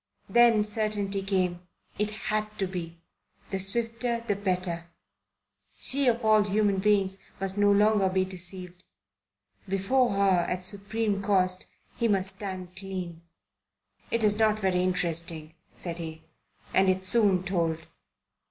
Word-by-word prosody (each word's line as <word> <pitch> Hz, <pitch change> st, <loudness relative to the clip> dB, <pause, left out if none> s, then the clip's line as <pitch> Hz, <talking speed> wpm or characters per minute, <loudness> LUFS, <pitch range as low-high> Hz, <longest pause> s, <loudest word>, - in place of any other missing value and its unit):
Then 235 Hz, -3 st, +5 dB
certainty 210 Hz, -2 st, -1 dB
came. 185 Hz, -3 st, -1 dB, 0.4 s
It 210 Hz, 0 st, +1 dB
had 215 Hz, 0 st, -3 dB
to 195 Hz, -, 0 dB
be. 170 Hz, -3 st, -6 dB, 0.5 s
The 195 Hz, -, -1 dB
swifter 230 Hz, +4 st, 0 dB
the 205 Hz, -, +1 dB
better. 180 Hz, -4 st, -2 dB, 0.9 s
She 275 Hz, 0 st, +2 dB
of 235 Hz, -1 st, +1 dB
all 215 Hz, -1 st, +5 dB
human 205 Hz, -1 st, +1 dB
beings 195 Hz, -1 st, +1 dB, 0.2 s
must 195 Hz, 0 st, -2 dB
no 205 Hz, 0 st, +4 dB
longer 205 Hz, -1 st, +4 dB
be 185 Hz, 0 st, +1 dB
deceived. 180 Hz, -1 st, -8 dB, 0.9 s
Before 215 Hz, +7 st, +2 dB
her, 195 Hz, -3 st, +2 dB
at 180 Hz, 0 st, -2 dB
supreme 200 Hz, +1 st, -1 dB
cost, 185 Hz, -2 st, +2 dB, 0.3 s
he 235 Hz, -, +1 dB
must 195 Hz, -2 st, 0 dB
stand 185 Hz, -3 st, -6 dB
clean. 185 Hz, -4 st, -6 dB, 0.9 s
"It's 215 Hz, -2 st, +2 dB
not 215 Hz, -1 st, +3 dB
very 190 Hz, -3 st, +1 dB
interesting," 170 Hz, -3 st, -2 dB, 0.2 s
said 170 Hz, -1 st, -5 dB
he. 160 Hz, -1 st, -7 dB, 0.5 s
"And 190 Hz, 0 st, +4 dB
it's 185 Hz, 0 st, +1 dB
soon 195 Hz, -4 st, +4 dB
told. 165 Hz, -3 st, -1 dB
195 Hz, 130 wpm, -27 LUFS, 185-210 Hz, 0.9 s, Then